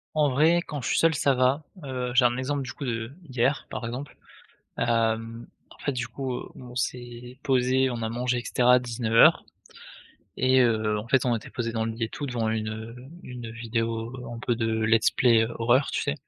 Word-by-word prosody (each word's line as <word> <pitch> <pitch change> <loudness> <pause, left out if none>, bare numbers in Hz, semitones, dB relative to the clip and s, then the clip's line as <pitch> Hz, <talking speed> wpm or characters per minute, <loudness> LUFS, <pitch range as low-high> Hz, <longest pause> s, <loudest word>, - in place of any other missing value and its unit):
En 150 -2 +3
vrai, 160 +6 +4
quand 150 -5 -6
je 120 - -4
suis - - +1
seul 165 0 +4
ça 140 -2 +2
va, 130 +4 +2 0.2
heu, 125 -2 -3
j'ai 125 0 +6
un 120 0 +3
exemple 140 +2 -2
du 125 - -7
coup - - -8
de 115 -2 -3
d'hier 135 -3 -1
par - - -5
exemple. 125 +5 -6 0.6
Hem, 115 0 0 0.2
en - - -17
fait 140 - -2
du 125 -2 -3
coup, 130 -2 -4
heu, - - -6
on 125 -1 -11
s'est 125 -1 -5
posé, 130 0 +2
on 120 -2 -4
a 110 - -2
mangé 125 +1 -1
et 120 - -6
cetera 125 0 +4
à - - +6
19:00 115 -2 +4 0.9
et 130 0 +4
heu, 110 -3 +1
en 105 - -6
fait 130 +1 +2
on 120 -1 +2
était 110 - -9
posé 115 -2 -3
dans 115 -1 -1
le 115 - -2
lit 115 +1 -2
et - - -4
tout, 145 - -6
devant 120 -4 -1
une, 110 -1 -1
heu, 110 +2 -7 0.3
une 120 -2 -8
vidéo 115 0 -3 0.2
un - - -7
peu 120 +1 0
de 115 -1 -1 0.2
let's 110 0 +4
play 115 -3 +4
heu, 115 - -6
horreur 120 +4 +3
tu - - -1
sais? 140 - -1
120 Hz, 220 wpm, -26 LUFS, 115-130 Hz, 0.9 s, j'ai